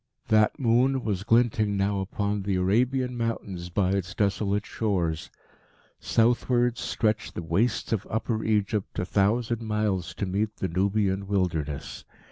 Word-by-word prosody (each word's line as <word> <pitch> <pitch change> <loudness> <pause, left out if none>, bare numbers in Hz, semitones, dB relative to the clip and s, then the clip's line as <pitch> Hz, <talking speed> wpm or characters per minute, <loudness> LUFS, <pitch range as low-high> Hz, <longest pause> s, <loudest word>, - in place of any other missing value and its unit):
That 110 -1 +4
moon 130 0 +2
was 100 -3 -2
glinting 115 -3 +2
now 100 0 +1
upon 100 +1 -2
the 95 0 -1
Arabian 125 +7 +1
Mountains 100 -7 -3
by 95 +1 +1
its 95 -1 -2
desolate 100 0 0
shores. 90 -8 -1 0.7
Southwards 120 +1 +2
stretched 110 -2 -1
the 85 - -4
wastes 100 +8 0
of 105 -2 -2
Upper 110 0 -1
Egypt 105 -1 0
a - - -1
thousand 110 +5 +1
miles 105 -5 -1
to 100 - -2
meet 105 +3 -1
the 95 - -3
Nubian 100 +2 0
wilderness. 80 -7 -2
105 Hz, 135 wpm, -26 LUFS, 95-115 Hz, 0.7 s, That